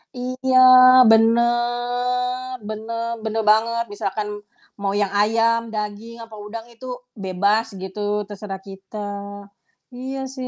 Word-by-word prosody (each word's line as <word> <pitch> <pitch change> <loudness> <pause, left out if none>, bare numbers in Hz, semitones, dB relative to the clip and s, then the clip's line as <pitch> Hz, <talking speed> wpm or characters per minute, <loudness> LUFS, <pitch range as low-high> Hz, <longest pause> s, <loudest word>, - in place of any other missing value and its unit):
Iya, 255 +1 -1 0.5
bener 245 +2 +1
bener 225 +2 -5 0.2
bener 220 0 -2
banget, 230 +2 +1
misalkan 205 0 -3 0.5
mau 200 -1 -2
yang 200 - +2
ayam, 230 +2 +2
daging, 210 +2 -5
apa 225 -1 -12
udang 215 +2 -8
itu 255 +3 -13 0.4
bebas, 200 +4 +1
gitu, 190 +2 -7 0.3
terserah 195 -2 -7
kita. 195 +2 -11 1.0
Iya 265 +2 -5 0.2
sih 255 -1 -5
225 Hz, 110 wpm, -21 LUFS, 210-245 Hz, 1.0 s, yang